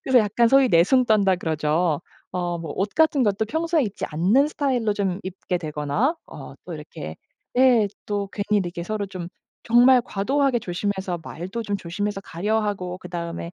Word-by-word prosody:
그래서 260 -2 +4
약간 230 +2 +3
소위 270 0 +5
"내숭 190 +10 +4
떤다." 200 -5 +3
그러죠. 160 -1 0 0.3
어 175 -1 -2
뭐 165 -1 -6
옷 195 +2 0
같은 315 -4 +4
것도 205 0 +1
평소에 320 +4 0
입지 205 - -4
않는 200 - +3
스타일로 255 -8 0
좀 195 -2 -1
입게 185 -1 -3
되거나 155 - -1
어 - - -10
또 - - -6
이렇게 - - -8 0.4
예 245 -5 +5 0.2
또 205 -1 -2
괜히 210 +1 0
이렇게 175 -1 -4
서로 210 +3 -3
좀 185 -3 -7 0.4
정말 245 +2 +6
과도하게 265 +5 +1
조심해서 190 -2 -3
말도 190 +10 -6
좀 205 -2 -2
조심해서 195 +3 -3
가려 210 +6 -1
하고 185 -4 -3
그 180 - -10
다음에 170 0 -5
200 Hz, 345 characters per minute, -23 LUFS, 175-240 Hz, 0.4 s, 정말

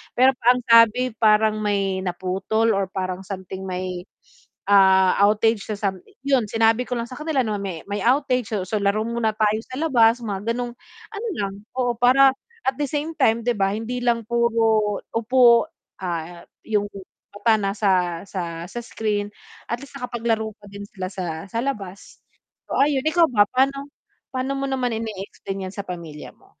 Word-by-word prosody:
pero 260 +2 +5
ang 250 0 +5
sabi 230 +2 +6
parang 215 0 +4
may 195 -2 0
naputol 190 +5 -1
or 195 0 0
parang 185 -1 -4
something 190 -1 -7
may, 180 0 -4 0.6
ah, 190 -2 +5
outage 215 0 +2
sa 215 - -2
sam 195 -2 -2 0.3
yun 265 -5 +3
sinabi 225 +3 +2
ko 250 - -2
lang 235 0 -4
sa 255 - -9
kanila 305 -3 0
name 210 -2 -2
may 190 -4 -4
may 205 - -2
outage 250 -3 +1
so 190 - -1
so 215 - -1
laro 200 +2 +1
muna 230 -2 -1
tayo 215 0 +2
sa 255 - -8
labas 240 -6 +3
mga 210 +2 -2
ganong 245 0 -3 0.4
ano 440 +3 -4
lang, 195 -1 -2 0.2
oo. 245 -2 +1
Para 260 +2 +6 0.4
at 265 - +2
the 290 - +1
same 300 +2 -2
time 230 -4 +2
di 245 - +3
ba 195 0 +1
hindi 230 +3 -3
lang 235 -1 +1
puro 225 -3 +2 0.2
upo, 235 +2 +5 0.4
ah, 170 0 -4 0.2
yung 205 -2 0 0.5
mata 220 +2 +3
nasa 200 0 0 0.4
sa 170 -3 -5
sa 240 - -6
screen 210 -2 -2 0.4
at 235 - -1
least 280 0 -12
nakapaglaro 230 -3 -2
pa 205 - -16
din 200 0 -8
sila 185 -3 -5
sa 170 -3 -5
sa 230 - -2
labas. 200 -8 -6 0.5
So - - -2
ayon. 275 -2 +2
Ikaw 330 +1 +4
ba, 205 -3 +5
paano 275 +2 0 0.4
paano 260 +1 -1
mo 275 0 -2
naman 250 -3 -1
in 225 0 -3 0.2
explain 195 -2 -6
yan - - -13
sa 200 - -4
pamilya 165 -4 -8
mo? - - -25
220 Hz, 175 wpm, -23 LUFS, 195-245 Hz, 0.6 s, sabi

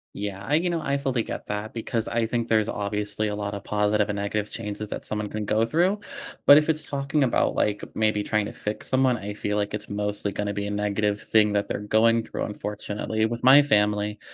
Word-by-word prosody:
Yeah, 100 -1 -5
I 145 +8 +1
you 175 +2 +2
know, 165 -2 -1
I 140 -1 0
fully 135 -4 -1
get - - -6
that 105 +1 -4
because 115 0 -2
I 115 -1 +1
think 115 0 -2
there's 110 -1 +3
obviously 105 +1 -2
a 105 - -3
lot 100 0 -4
of 100 - -6
positive 105 0 +1
and 100 - -2
negative 100 +1 -2
changes 105 -1 -5
that - - -6
someone 105 -1 -3
can 105 0 -4
go 110 +2 +2
through, 180 - +1 0.4
but 145 - +10
if 150 +1 +3
it's 155 -1 0
talking 140 +1 -1
about, 125 - +1
like, 105 -1 +1
maybe 110 -1 +1
trying 105 0 0
to - - -6
fix 105 0 -5
someone, 130 -1 +3
I 105 0 -5
feel 105 0 -2
like 105 0 -1
it's 105 0 -5
mostly 105 0 -2
gonna 100 0 -2
be 100 0 -3
a - - -3
negative 105 0 0
thing 105 -2 +3
that 100 0 0
they're - - -2
going 110 +2 +3
through. - - -4
Unfortunately, 105 +1 -3
with 115 +1 -3
my 135 +3 +9
family, 105 -4 +1
105 Hz, 225 wpm, -25 LUFS, 105-115 Hz, 0.4 s, but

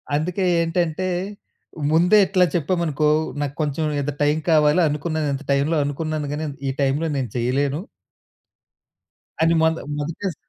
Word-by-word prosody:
అందుకే 180 +6 -1 0.2
ఏంటంటే, 165 +1 -1 0.8
ముందే 175 +6 +5
ఇట్లా 185 -1 +3
చెప్పామనుకో 160 -2 0 0.3
నాకు 145 -1 -3
కొంచెం 150 +1 -1 0.2
ఇంత 145 +1 -2
టైమ్ 150 +2 +2
కావాలి 150 +2 +4
అనుకున్నాను. 155 +1 -2
ఇంత 135 +1 -5
టైమ్‌లో 140 +4 +2
అనుకున్నాను 150 +1 -3
గాని 155 +2 -3 0.2
ఈ - - +1
టైమ్‌లో 140 +4 +1
నేను 130 -3 -2
చేయలేను... 135 +5 0 1.6
అని 165 +1 +4
మొద 160 0 +3 0.2
మొదటే 160 +7 -4
స - - -16
155 Hz, 130 wpm, -22 LUFS, 145-165 Hz, 1.6 s, ముందే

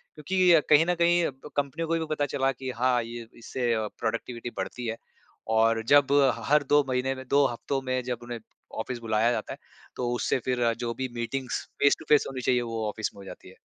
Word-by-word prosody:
क्योंकि 180 +4 +2
अ, 165 - +7
कहीं 155 +2 +6
न 175 0 +1
कहीं 170 0 +3
ब 135 +2 -9
कंपनियों 145 +4 -1
को 165 - +2
भी 160 - -2
पता 145 - 0
चला 135 -2 0
कि 130 0 -6
हाँ, 125 0 +2
ये 115 0 -8
इससे 120 0 -2 0.3
प्रोडक्टिविटी 115 +1 -3
बढ़ती 120 -2 -4
है 115 0 -3 0.6
और 115 0 +3
जब 145 -1 +5 0.3
ह - - -9
हर 150 0 +5
2 145 0 +5
महीने 130 +1 0
में 130 0 -9
2 140 0 +4
हफ़्तों 135 +3 -3
में 130 -1 -1
जब 125 -1 -3
उन्हें 120 -1 -6 0.4
ऑफ़िस 120 +1 -4
बुलाया 115 +1 +1
जाता - - -3
है - - -10 0.4
तो 120 -1 -2
उससे 120 - 0
फ़िर 125 -1 0
अ, 115 -1 +3
जो 115 0 -4
भी 130 +1 -4
मीटिंग्स 125 +2 -3 0.2
फ़ेस 140 - +5
टू 160 - -11
फ़ेस 150 -1 +5
होनी 130 -1 -5
चाहिए 125 0 +2
वो 115 -2 -3
ऑफ़िस 110 +1 -3
में 100 - -13
हो - - -11
जाती - - -11
है। - - -16
130 Hz, 230 wpm, -27 LUFS, 115-145 Hz, 0.6 s, अ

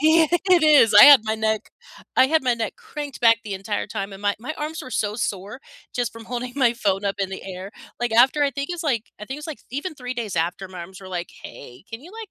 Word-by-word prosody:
Yeah, 315 +2 +5 0.2
it 355 -3 +6
is. 295 -8 +6
I - - +11
had 285 -5 +10
my 220 0 -1
neck 220 -1 -2 0.5
I 260 - +6
had 315 +1 +2
my 250 -2 +2
neck 230 -1 -4
cranked 290 -3 -8
back 230 -1 +6
the 205 -2 -4
entire 205 +2 -3
time 205 -1 -5
and 195 - -12
my 205 0 +1
my 265 +7 -6
arms 310 +2 -4
were 255 - -10
so 210 -3 -1
sore 205 +2 -4 0.3
just 245 -2 -2
from 230 0 -11
holding 245 +1 -5
my 255 -4 +3
phone 200 -3 -1
up 200 0 -1
in 195 -1 -2
the 190 - -7
air, 190 +1 -7 0.3
like, 240 -2 -1
after 260 +6 +4
I 280 - +2
think 280 0 -5
it's, 350 -1 -5
like 240 -8 0 0.2
I - - -6
think 270 +3 -6
it's 300 - -8
like 315 -3 -7
even 300 +6 -4
3 250 -3 -6
days 220 -7 -4
after 175 +3 -2
my 185 -1 -9
arms 185 +3 -10
were 190 - -11
like, 175 - -6
"Hey, 125 +4 -12
can 225 0 -7
you 335 +7 -14
like 445 -2 -9
235 Hz, 265 wpm, -23 LUFS, 200-285 Hz, 0.5 s, I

